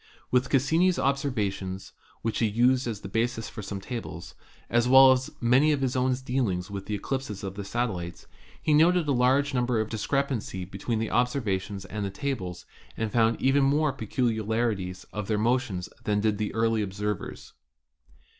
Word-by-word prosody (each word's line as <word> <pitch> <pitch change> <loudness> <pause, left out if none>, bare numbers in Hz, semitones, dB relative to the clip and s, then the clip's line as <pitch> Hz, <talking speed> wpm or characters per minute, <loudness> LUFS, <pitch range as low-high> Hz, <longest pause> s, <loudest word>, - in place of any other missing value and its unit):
With 125 +1 +2
Cassini's 160 +7 +3
observations, 105 -9 -2 0.3
which 115 0 -1
he 115 - +3
used 125 +4 +2
as 110 -4 -4
the - - -7
basis 115 +2 -1
for - - -7
some 100 0 -5
tables, 90 -7 -7 0.3
as 120 +1 +2
well 130 0 +9
as 130 0 +1
many 130 +6 +4
of 145 -2 0
his 130 -1 0
own 130 0 +2
dealing 120 -9 0
with 100 -1 -6
the 105 - -1
eclipses 110 -2 -4
of 95 -1 -4
the 100 +1 -6
satel 115 0 -1
lites, 85 0 -8 0.3
he 155 - +1
noted 165 +2 +4
a - - +2
large 135 +3 +3
number 125 -2 +1
of 110 0 -1
discrepancies 115 -5 -2
between 100 +4 -3
the 110 0 -2
observations 105 -6 -1
and 105 +2 -5
the 100 - -1
tables, 95 -6 -4 0.3
and 110 -1 -2
found 115 0 +2
even 135 +1 +3
more 145 +1 +2
pecu 110 0 -1
liarities 105 -5 -1
in 105 -1 -3
their 105 +1 0
motions 110 -5 0 0.2
than 105 -1 +1
did 105 0 0
the 105 - -1
early 115 -1 +2
observers. 105 0 -4
115 Hz, 175 wpm, -27 LUFS, 100-130 Hz, 0.3 s, well